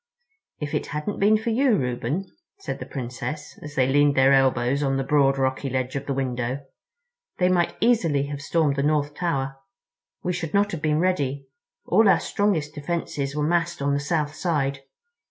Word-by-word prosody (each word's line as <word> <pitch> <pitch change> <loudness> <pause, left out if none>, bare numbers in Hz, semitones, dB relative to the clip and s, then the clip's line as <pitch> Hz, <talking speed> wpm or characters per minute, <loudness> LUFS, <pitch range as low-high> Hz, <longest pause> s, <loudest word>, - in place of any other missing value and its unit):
"If 150 -1 -4
it - - -1
hadn't 150 +7 -4
been 210 +2 +5
for 225 +2 -2
you, 250 0 +3
Reuben," 125 +7 -2 0.3
said 395 - -5
the - - -7
Princess, 130 +3 -6
as 150 0 -9
they 130 - +3
leaned 145 +2 +3
their 135 +1 +5
elbows 135 0 +2
on 135 -2 +1
the 135 - 0
broad 135 -1 +3
rocky 130 +1 -1
ledge 130 0 -2
of 140 - -4
the 140 - 0
window, 130 +1 -2 0.7
"they 180 0 +3
might 175 -2 +1
easily 180 - +2
have 145 0 -6
stormed 145 -2 +1
the - - +2
North 145 0 +1
Tower—we 165 - -5
should 165 -2 -3
not 205 +1 +3
have 165 - -5
been 150 0 +1
ready—all 145 +4 0
our - - +5
strongest 165 -8 0
defenses 145 -2 -3
were 150 -1 0
massed 170 0 0
on 140 0 0
the 140 - +1
south 150 0 -1
side. 145 -4 -1
145 Hz, 175 wpm, -24 LUFS, 135-170 Hz, 0.7 s, been